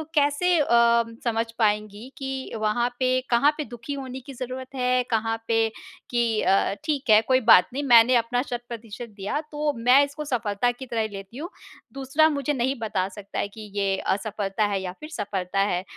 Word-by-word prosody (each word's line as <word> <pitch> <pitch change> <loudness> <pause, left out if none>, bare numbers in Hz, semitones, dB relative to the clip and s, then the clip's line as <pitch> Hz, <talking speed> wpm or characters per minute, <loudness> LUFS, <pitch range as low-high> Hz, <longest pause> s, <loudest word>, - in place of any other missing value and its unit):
कैसे 290 +5 +2
अ, 235 -4 +4 0.2
समझ 230 -1 0
पाएँगी 210 +1 0
कि 265 -1 -5
वहाँ 235 +3 +1
पे 255 0 +2
कहाँ 245 +5 +4
पे 305 - -2
दुखी 240 +5 -6
होने 265 -2 -6
की - - -6
ज़रूरत 255 +2 -7
है? 250 0 +2
कहाँ 225 0 0
पे 225 -1 +2 0.5
कि 240 -1 +1 0.2
अ, 195 0 +2
"ठीक 295 -5 -2
है, 215 0 +7
कोई 255 +3 +2
बात 180 - +8
नहीं। 285 - -2
मैंने 240 -1 +6
अपना 245 +1 +1
शत-प्रतिशत 235 -1 -7
दिया, 205 +8 -3
तो 295 0 -1
मैं 250 +4 +5
इसको 295 +2 -7
सफलता 235 -3 0
की 250 +2 -9
तरह 235 -2 -2
ही 220 - -1
लेती 195 +4 -9
हूँ। 335 +5 -5 0.4
दूसरा 275 +4 +2
मुझे 285 -1 -1
नहीं 260 0 0
बता 195 -4 -1
सकता 200 0 -7
है - - 0
कि 210 +1 -11
ये 195 -1 0
असफलता 205 +1 -2
है 195 -2 -2
या 180 -1 -4
फिर 305 - -9
सफलता 195 - -3
है।"? 190 -2 +1
235 Hz, 190 wpm, -25 LUFS, 210-265 Hz, 0.5 s, बात